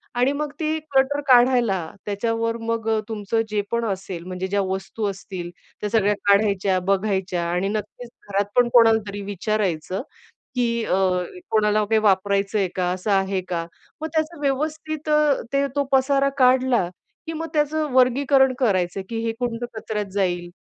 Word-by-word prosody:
आणि 250 +3 +3
मग 295 0 -3
ती 315 0 0
क्लटर 285 -1 +1
काढायला. 245 -5 +5 0.3
त्याच्यावर 230 +2 -1
मग 225 0 -2 0.2
तुमचं 220 +1 -1
जे 210 -1 0
पण 235 0 0
असेल 190 -4 -4
म्हणजे 185 +1 -4
ज्या 200 +1 0
वस्तू 190 +3 -3
असतील 190 -3 -7 0.3
त्या 210 - -2
सगळ्या 210 -2 +3
काढायच्या, 200 -2 +3
बघायच्या. 190 -1 0
आणि 180 +3 0
नक्कीच 215 +3 -5 0.2
घरात 200 0 +1
पण 245 -1 +4
कोणालातरी 220 -4 +4
विचारायचं, 195 -2 -2 0.5
की 235 -2 0
अ, - - +1 0.5
कोणाला 215 -1 +2
काही 220 +1 +2
वापरायचंय 200 0 +2
का? 180 -1 0
असं 185 +3 -3
आहे 195 0 +1
का? 170 -2 -2 0.3
मग 315 - -2
त्याचं 315 0 -1
व्यवस्थित 310 +2 -2
अ, 300 -2 +3
ते 280 0 +2
तो 285 - +2
पसारा 275 +1 +3
काढला, 255 -6 +4 0.4
की 325 - -4
मग 325 +1 -4
त्याचं 305 0 +1
वर्गीकरण 265 +1 +4
करायचं, 195 -6 +1
की 230 - -3
हे 225 - 0
कोणतं 240 -1 -2
कचऱ्यात 210 -1 -3
जाईल. 175 -3 -1
220 Hz, 150 wpm, -23 LUFS, 195-260 Hz, 0.5 s, काढायला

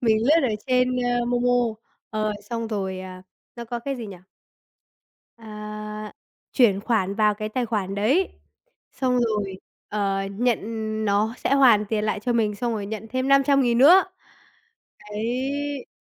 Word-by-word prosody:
mình 225 -3 +3
lướt 315 +4 +5
ở - - -1
trên, 250 -1 +2
ơ, 245 -1 0
MoMo, 245 0 +1 0.6
ờ, 215 -1 -1 0.2
xong 230 -1 -3
rồi, 190 -3 -3
à, 185 -1 -9 0.3
nó 235 - -6
có 240 +1 -4
cái 275 +3 -4
gì 230 -3 -6
nhỉ? 195 - -9 1.2
À, 210 -1 -7 0.4
chuyển 220 -7 +4
khoản 200 -4 0
vào 210 -1 +3
cái 215 +1 -5
tài 245 +2 -1
khoản 200 -3 -2
đấy, 265 - +2 0.6
xong 250 -2 0
rồi, 210 -5 -1 0.3
ờ, 195 -2 -1
nhận 235 +2 +1 0.5
nó 210 +3 +1
sẽ - - 0
hoàn 240 -7 +5
tiền 210 0 -1
lại 215 -1 -1
cho 240 +3 -1
mình 215 -3 +1
xong 240 +1 -2
rồi 205 -2 -3
nhận 220 +1 -6
thêm 255 +1 -1
500.000 275 -3 +4
nữa. 345 +9 +8 1.1
Đấy! 265 +6 -3
225 Hz, 155 wpm, -24 LUFS, 210-250 Hz, 1.2 s, nữa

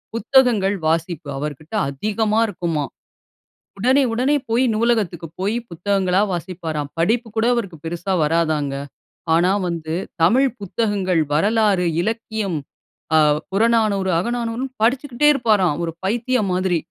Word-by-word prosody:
புத்தகங்கள் 230 -5 +3
வாசிப்பு 165 -1 -1
அவர்கிட்ட 150 +3 -6 0.2
அதிகமா 215 +9 0
இருக்குமாம். 165 -6 -3 0.9
உடனே, 260 +6 +4
உடனே 255 +5 +2 0.2
போயி 245 +3 +3
நூலகத்திற்கு 215 -7 0
போயி 205 +4 0
புத்தகங்களா 190 +2 +1
வாசிப்பாராம். 165 -4 -4
படிப்பு 225 +8 +1
கூட 220 - +2
அவருக்கு 195 -8 -3
பெருசா 175 +3 -3
வராதாங்க. 155 -3 0 0.6
ஆனா 175 +3 +3 0.2
வந்து, 160 -2 -4 0.3
தமிழ் 255 +10 +4
புத்தகங்கள், 195 -3 0
வரலாறு, 205 +2 +2 0.2
இலக்கியம், 220 -3 -2 0.6
அ - - +6 0.3
புறநானூறு, 215 -2 +2
அகநானூறுன்னு 240 +4 -3
படிச்சுக்கிட்டே 260 +3 +2
இருப்பாராம். 210 - +2
ஒரு 165 - -2
பைத்தியம் 230 0 0
மாதிரி 185 -1 +1
195 Hz, 110 wpm, -21 LUFS, 170-230 Hz, 0.9 s, அ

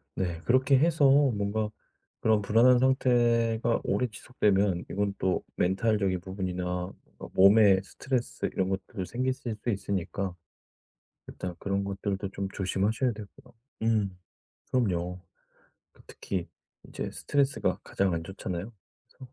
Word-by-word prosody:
네 85 -3 -2
그렇게 130 +2 +4
해서 155 +1 +3
뭔가 110 -6 +2 0.5
그런 110 -1 +3
불안한 115 +5 +5
상태가 120 -3 +2
오래 125 - 0
지속되면 100 -5 0
이건 100 0 -1
또 95 -1 0
멘탈적인 95 -1 +1
부분이나 95 -1 -4 0.5
어 - - -8
몸에 100 0 +6
스트레스 125 +4 -3
이런 95 -1 0
것들 95 0 -4
생기실 130 -2 -2
수 - - -1
있으니까 95 -2 -2 0.9
일단 90 -1 -6
그런 100 0 -1
것들도 100 0 -3
좀 100 0 -4
조심하셔야 105 +6 0
되고요. 105 -2 -12 0.3
음 105 -5 +1 0.5
그럼요. 90 -7 0 0.7
그 - - -21
특히 90 -3 -5 0.4
이제 - - -5
스트레스가 140 -1 0
가장 95 -2 0
안 80 0 -3
좋잖아요. 95 +2 -5 0.3
그래서 130 -1 -15
100 Hz, 285 characters per minute, -28 LUFS, 95-120 Hz, 0.9 s, 몸에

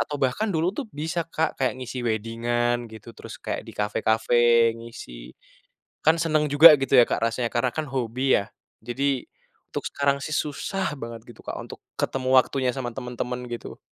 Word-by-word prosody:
atau 150 - -2
bahkan 135 - +1
dulu 165 +1 +1
tuh 280 - -3
bisa, 160 +3 -2
Kak, 160 -1 -2
kayak 130 -3 0
ngisi 125 0 -5
wedding-an 120 +2 0
gitu. 110 +1 -11
Terus - - -10
kayak - - -4
di - - -8
kafe-kafe, 115 +2 +3
ngisi. 65 - -10 0.7
Kan 160 +2 +6
seneng 155 -2 +2
juga 155 +3 +10
gitu 135 0 -2
ya, 125 - +9
Kak, - - 0
rasanya 115 +1 -1
karena 120 +1 +1
kan 155 - -1
hobi 130 0 +1
ya. 100 - -5 0.3
Jadi 130 +3 -2 0.4
untuk - - -5
sekarang 140 0 +1
sih 155 - -5
susah 155 +2 -2
banget 115 -3 -8
gitu, - - -17
Kak, - - -5
untuk - - -9 0.2
ketemu 130 -1 -1
waktunya 130 0 0
sama 125 -1 -4
temen-temen 125 -1 -4
gitu. 120 - -7
125 Hz, 170 wpm, -25 LUFS, 115-145 Hz, 0.7 s, juga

